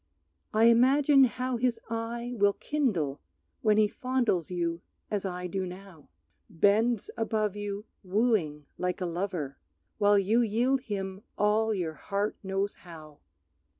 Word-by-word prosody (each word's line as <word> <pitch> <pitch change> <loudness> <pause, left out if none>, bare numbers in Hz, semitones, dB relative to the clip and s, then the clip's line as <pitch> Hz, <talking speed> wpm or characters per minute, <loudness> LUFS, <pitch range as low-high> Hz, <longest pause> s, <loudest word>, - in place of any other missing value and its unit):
I 215 +1 +3
imagine 270 +4 +6
how 255 0 -2
his 235 -1 0
eye 235 +2 -4
will 205 -2 +3
kindle 190 - -1 0.4
When 215 -2 +3
he 215 -1 +5
fondles 240 - -1
you 170 -2 -2 0.3
as 205 -2 -1
I 180 -1 -4
do 190 +2 -2
now, 180 -3 -10 0.4
Bends 210 +5 +2
above 215 -2 -1
you 205 0 -5 0.2
wooing 185 -7 0
like 180 +1 -1
a 185 - -2
lover, 170 -5 -3 0.4
While 205 0 +5
you 210 +5 +3
yield 240 +4 +1
him 195 -2 -4 0.2
all 215 +2 +2
your 175 -6 -2
heart 200 +7 -2
knows 195 +1 -2
how. 155 -4 -13
205 Hz, 135 wpm, -29 LUFS, 180-230 Hz, 0.4 s, imagine